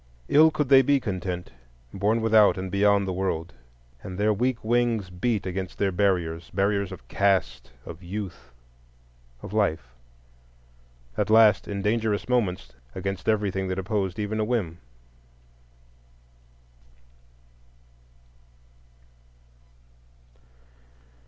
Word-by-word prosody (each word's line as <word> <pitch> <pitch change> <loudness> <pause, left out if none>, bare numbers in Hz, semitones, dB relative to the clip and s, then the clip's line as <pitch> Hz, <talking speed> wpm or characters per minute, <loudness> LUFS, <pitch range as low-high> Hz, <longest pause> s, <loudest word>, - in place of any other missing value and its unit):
Ill 155 +2 +6
could 150 -2 -2
they 135 -1 +8
be 140 +1 +2
content, 90 - -4 0.4
born 105 +4 +1
without 110 -3 +4
and 95 0 -5
beyond 100 0 +3
the 95 - -2
World. 90 -5 -3 0.5
And 90 +5 -8
their 105 +1 +2
weak 125 +3 -1
wings 115 -4 0
beat 105 +4 -1
against 95 0 -5
their 100 -1 +1
barriers,—barriers 95 +2 0
of - - -11
caste, 95 -10 0 0.2
of 80 - -9
youth, 95 -5 -7 0.9
of - - -8
life; 100 - 0 1.3
at - - 0
last, 110 -2 +5
in 100 -1 -4
dangerous 110 -1 0
moments, 105 -7 -1 0.2
against 95 +2 -3
everything 100 -3 0
that 95 0 -3
opposed 95 -1 -2
even 110 +1 -3
a - - +1
whim. 105 -8 -2
100 Hz, 105 wpm, -25 LUFS, 95-110 Hz, 1.3 s, they